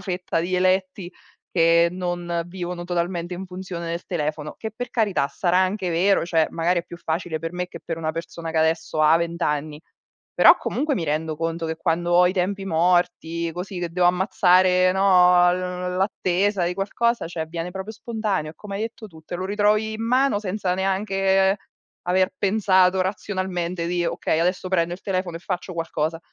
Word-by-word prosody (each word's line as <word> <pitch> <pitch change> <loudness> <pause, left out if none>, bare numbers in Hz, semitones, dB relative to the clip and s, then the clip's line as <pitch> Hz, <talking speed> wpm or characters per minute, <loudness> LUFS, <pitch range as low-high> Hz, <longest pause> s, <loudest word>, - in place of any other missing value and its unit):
fetta 180 -3 -2
di 180 +2 -2
eletti 185 0 0 0.4
che 170 0 +4
non 175 -1 -3
vivono 175 -1 -5
totalmente 175 0 -2
in 185 - -6
funzione 180 -2 -6
del 170 +1 -4
telefono. 150 -3 -3
Che 220 - -5
per 245 +3 -5
carità, 205 - +1
sarà 180 -1 +1
anche 185 -1 0
vero, 185 +4 +2
cioè, 165 -2 +2
magari 170 +1 +1
è 170 - -18
più 175 - -10
facile 165 -1 -3
per 165 +1 -5
me 180 0 -3
che - - -10
per 165 -1 -4
una 160 -1 -1
persona 165 0 -6
che 160 - -4
adesso 160 0 +1
ha 155 +1 +6
vent'anni. 155 -3 -2 0.5
Però - - +7
comunque 295 -1 -1
mi 170 - -2
rendo 155 +1 -1
conto 165 +1 -2
che 160 0 -3
quando 175 0 0
ho 180 +1 +6
i - - -1
tempi 195 +1 -1
morti, 170 -1 +1
così, 180 +2 -6
che 175 -1 -3
devo 175 +1 +2
ammazzare, 185 0 +4
no, 180 -2 +5
l 180 0 -3
l'attesa 190 0 +1
di 175 +1 -1
qualcosa, 230 +3 0
cioè, 165 -1 -4
viene 170 +2 -5
proprio 190 +3 -6
spontaneo, 215 - -3
è - - -33
come 200 -2 -7
hai 215 - -3
detto 225 -1 -6
tu, 160 -4 -15
te 165 - -8
lo 185 +1 -3
ritrovi 210 +2 +1
in 220 - -5
mano 255 -2 +3
senza 195 -2 -2
neanche 195 0 +1 0.5
aver 185 +1 +2
pensato 190 -2 +3
razionalmente 185 -3 -3
di: 175 0 0
"Okay, 160 - -1
adesso 180 +2 0
prendo 175 -2 +1
il 185 - -13
telefono 185 -3 -2
e - - -9
faccio 180 0 -4
qualcosa." 165 -1 -2
180 Hz, 180 wpm, -23 LUFS, 170-190 Hz, 0.5 s, Però